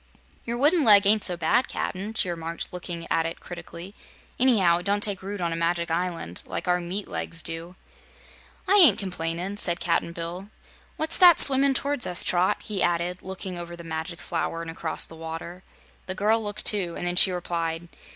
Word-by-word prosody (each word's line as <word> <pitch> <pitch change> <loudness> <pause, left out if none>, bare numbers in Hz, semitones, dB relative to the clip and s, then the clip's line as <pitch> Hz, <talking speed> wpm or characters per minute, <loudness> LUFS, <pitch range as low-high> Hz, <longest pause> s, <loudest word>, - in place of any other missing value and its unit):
"Your 235 0 -3
wooden 300 +5 +3
leg 205 -4 +6
ain't 210 +1 +3
so 180 -2 -1
bad, 245 +8 +1
Cap'n," 205 +4 -5
she 185 - +2
remarked, 165 0 -6
looking 175 -2 -6
at 165 0 +1
it 165 - -7
critically. 175 +2 -9 0.5
"Anyhow, 200 -10 +3
it 175 - -10
don't 205 +1 +1
take 200 -3 +4
root 200 +2 -6
on 170 -2 -2
a - - -3
Magic 170 0 -1
Island, 165 - -3
like - - -5
our 180 0 +2
meat 185 +4 -4
legs 165 -1 -3
do." 165 +2 -4 0.9
"I 400 - +4
ain't 310 - +7
complainin'," 180 +1 -4
said 175 -3 +2
Cap'n 170 -1 -1
Bill. 170 +4 -7 0.5
"What's 315 +1 0
that 350 -3 +8
swimmin' 270 0 +5
towards 280 -3 +1
us, 180 - +7
Trot?" 180 +1 +1
he 205 -3 -4
added, 175 +1 -1
looking 190 -1 -6
over 175 0 -7
the 170 - -11
Magic 165 +1 -6
Flower 165 0 -3
and 165 - -7
across 165 -1 -1
the 165 - -13
water. 165 +2 -8 0.5
The 185 - -3
girl 215 +4 +1
looked, 205 0 -6
too, 185 -5 +2
and - - -4
then 175 0 +1
she 190 - +6
replied. 170 -2 -4
180 Hz, 190 wpm, -25 LUFS, 170-205 Hz, 0.9 s, that